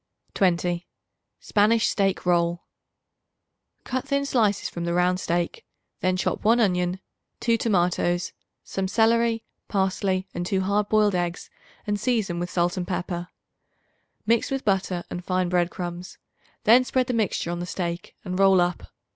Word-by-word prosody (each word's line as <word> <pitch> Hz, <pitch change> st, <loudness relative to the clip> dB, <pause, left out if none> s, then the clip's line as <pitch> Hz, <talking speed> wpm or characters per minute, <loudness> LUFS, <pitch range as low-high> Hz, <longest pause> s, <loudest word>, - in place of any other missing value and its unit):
20. 175 Hz, -2 st, +1 dB, 0.5 s
Spanish 215 Hz, +2 st, +3 dB
Steak 195 Hz, -2 st, 0 dB
Roll. 175 Hz, -1 st, +1 dB, 1.2 s
Cut 260 Hz, +1 st, -3 dB
thin 280 Hz, 0 st, 0 dB
slices 215 Hz, -7 st, +1 dB
from 170 Hz, -, -6 dB
the 170 Hz, 0 st, -1 dB
round 180 Hz, +1 st, +2 dB
steak; 175 Hz, -, -2 dB, 0.4 s
then 185 Hz, 0 st, +1 dB
chop -, -, -1 dB
1 230 Hz, +3 st, +4 dB
onion, 180 Hz, -3 st, +1 dB, 0.4 s
2 230 Hz, -1 st, +2 dB
tomatoes, 175 Hz, -4 st, +1 dB, 0.3 s
some 195 Hz, -1 st, -3 dB
celery, 230 Hz, +2 st, +2 dB, 0.2 s
parsley 190 Hz, -1 st, 0 dB
and 175 Hz, -, -3 dB
2 190 Hz, +2 st, 0 dB
hard 200 Hz, +2 st, 0 dB
boiled 210 Hz, -2 st, +3 dB
eggs 175 Hz, -1 st, -2 dB, 0.3 s
and 205 Hz, -1 st, -1 dB
season 210 Hz, -9 st, 0 dB
with 175 Hz, +1 st, -3 dB
salt 175 Hz, +1 st, 0 dB
and 180 Hz, -1 st, -3 dB
pepper. 175 Hz, -1 st, -3 dB, 1.0 s
Mix 230 Hz, +1 st, +2 dB
with 270 Hz, -1 st, -3 dB
butter 190 Hz, -3 st, 0 dB
and 175 Hz, -, -5 dB
fine 185 Hz, 0 st, 0 dB
bread 175 Hz, -1 st, +2 dB
crumbs; 175 Hz, 0 st, -6 dB, 0.5 s
then 240 Hz, +4 st, +6 dB
spread 255 Hz, 0 st, +1 dB
the 250 Hz, -, -2 dB
mixture 210 Hz, -6 st, 0 dB
on 175 Hz, -, -3 dB
the 175 Hz, -, -4 dB
steak, 170 Hz, -1 st, -4 dB
and 185 Hz, 0 st, -3 dB
roll 195 Hz, -1 st, +6 dB
up. 175 Hz, 0 st, -1 dB
185 Hz, 150 wpm, -25 LUFS, 175-215 Hz, 1.2 s, then